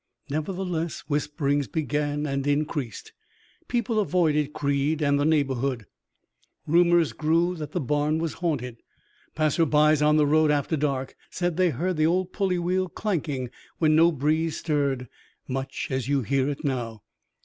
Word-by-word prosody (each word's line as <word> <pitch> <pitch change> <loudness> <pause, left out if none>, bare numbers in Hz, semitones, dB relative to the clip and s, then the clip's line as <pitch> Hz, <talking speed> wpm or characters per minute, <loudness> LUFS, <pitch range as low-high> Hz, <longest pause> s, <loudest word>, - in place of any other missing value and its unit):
Nevertheless, 170 +1 -3
whisperings 145 -2 0
began 150 -1 -1
and 140 -1 -2
increased. 145 -5 -2 0.5
People 235 -2 0
avoided 155 -7 +1
Creed 145 +1 0
and 140 -1 +2
the 145 - +1
neighborhood. 135 -6 0 0.8
Rumors 170 0 +4
grew 165 +3 +1
that 150 -2 -6
the - - 0
barn 150 +3 0
was 165 -1 -2
haunted. 125 -8 -2 0.6
Passers 155 +1 +2
by 150 +1 +4
on 150 +1 +3
the 150 - +4
road 155 +1 +3
after 150 +2 +1
dark 135 -3 -2
said 175 -2 -2
they 185 0 +3
heard 170 +5 -2
the 155 0 +3
old 185 +2 0
pulley 190 -3 0
wheel 180 +1 0
clanking 150 - -3 0.3
when 155 -2 +3
no 165 +2 +6
breeze 155 +2 0
stirred, 140 -5 -1 0.4
much 135 0 -4
as 130 -2 -1
you 140 -2 +1
hear 135 +3 +1
it 145 +2 -5
now. 115 -6 -3
150 Hz, 150 wpm, -25 LUFS, 140-165 Hz, 0.8 s, no